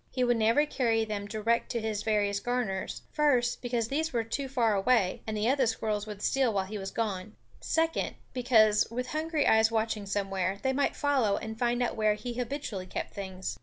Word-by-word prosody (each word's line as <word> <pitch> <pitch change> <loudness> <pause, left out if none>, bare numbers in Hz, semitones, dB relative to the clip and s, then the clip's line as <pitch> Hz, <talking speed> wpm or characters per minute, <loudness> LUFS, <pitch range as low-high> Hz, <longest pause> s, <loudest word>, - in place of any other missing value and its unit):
He 255 - -1
would 240 -1 +3
never 230 +7 +3
carry 230 -6 +1
them 205 -2 -4
direct 230 +2 0
to 235 - 0
his 215 -2 -2
various 205 -2 +1
garners; 235 -5 -2
first, 260 -6 +2
because 240 -2 -1
these 315 +3 -1
were 235 -2 0
too 265 +4 -4
far 235 -5 +2
away, 200 -1 +2
and 215 -1 -2
the 210 +2 0
other 265 -1 +3
squirrels 215 -2 -1
would 210 -1 -7
steal 270 -3 +2
while 195 -2 0
he 210 +2 -6
was 195 0 -4
gone; 210 -2 -3 0.2
second, 325 0 0 0.2
because, 220 -4 +4
with 250 +2 -4
hungry 310 -1 0
eyes 220 0 +5
watching 220 -2 -1
somewhere, 195 -1 -1
they 265 0 +1
might 280 +1 +1
follow 265 -9 +2
and 220 0 -6
find 240 0 +1
out 245 - -1
where 215 -1 +2
he 240 +3 -5
habitually 240 -6 -4
kept - - -5
things. 190 -2 -5
225 Hz, 200 wpm, -29 LUFS, 210-250 Hz, 0.2 s, eyes